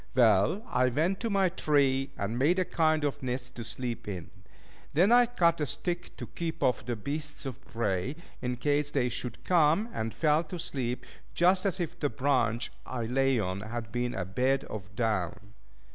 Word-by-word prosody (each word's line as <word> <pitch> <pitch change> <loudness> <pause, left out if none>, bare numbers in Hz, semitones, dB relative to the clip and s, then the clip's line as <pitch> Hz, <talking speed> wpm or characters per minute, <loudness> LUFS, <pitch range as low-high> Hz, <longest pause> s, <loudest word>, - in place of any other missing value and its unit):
Well, 115 - +4
I 125 0 +2
went 165 +9 +1
to 230 - -2
my 195 -2 +3
tree, 140 -6 +2
and 110 +5 -2
made 160 +7 +3
a 185 - +2
kind 155 -2 +2
of 145 0 -1
nest 125 0 -3
to 120 - -4
sleep 120 -1 -5
in. 90 -5 -5 0.6
Then 185 +8 +5
I 245 0 +7
cut 170 -9 +2
a 150 - +1
stick 175 -1 -3
to - - -5
keep 165 -1 -4
off 125 -3 +2
the 120 +1 -2
beasts 145 +6 -4
of 135 0 -6
prey, 115 +2 -1 0.3
in 125 -1 -2
case 145 +3 +1
they 130 -4 +1
should 120 0 -5
come, 175 +5 +3
and 110 0 -2
fell 155 +3 +2
to 175 +3 -6
sleep 135 -8 -3 0.3
just 185 +3 +4
as 190 0 -1
if 175 0 -3
the 145 - +1
branch 125 -5 +1
I 120 -3 -4
lay 135 +2 +2
on 95 -1 -2
had 110 0 -5
been 120 +1 -1
a 90 - -2
bed 130 +8 +1
of 100 -2 -8
down. 100 -3 -1
135 Hz, 190 wpm, -29 LUFS, 115-160 Hz, 0.6 s, I